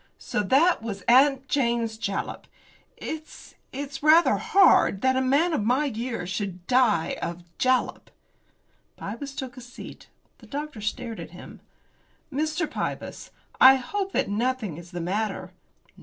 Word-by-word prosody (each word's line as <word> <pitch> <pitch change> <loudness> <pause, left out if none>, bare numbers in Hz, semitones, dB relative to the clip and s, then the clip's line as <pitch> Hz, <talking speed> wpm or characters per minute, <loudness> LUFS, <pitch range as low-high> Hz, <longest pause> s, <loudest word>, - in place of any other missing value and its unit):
"So - - -2
that 275 - +3
was 200 -4 -6
'Aunt 270 +2 +5
Jane's 235 -5 0
Jalap.' 200 -3 -4 0.5
It's 315 0 -8 0.2
it's 275 0 -6
rather 315 +3 +5
hard 295 - +4
that 260 0 +3
a 260 - +2
man 285 +7 +2
of 215 - 0
my 250 +7 +2
years 230 -7 -4
should 190 -2 -4
die 235 -9 +2
of 175 +1 -5 0.2
jalap." 255 0 +1 0.9
Pybus 270 +7 -6
took 260 -1 -6
a - - -8
seat. 245 +1 -11 0.3
The - - -16
doctor 295 -5 -6
stared 225 +2 -4
at - - -7
him. - - -12 0.7
"Mr. 310 +3 -1
Pybus, - - -5 0.3
I 265 +1 +9
hope 390 +10 -3
that - - +1
nothing 220 -4 -1
is 175 0 -11
the 175 -1 -5
matter." 190 0 -2
250 Hz, 140 wpm, -25 LUFS, 210-280 Hz, 0.9 s, I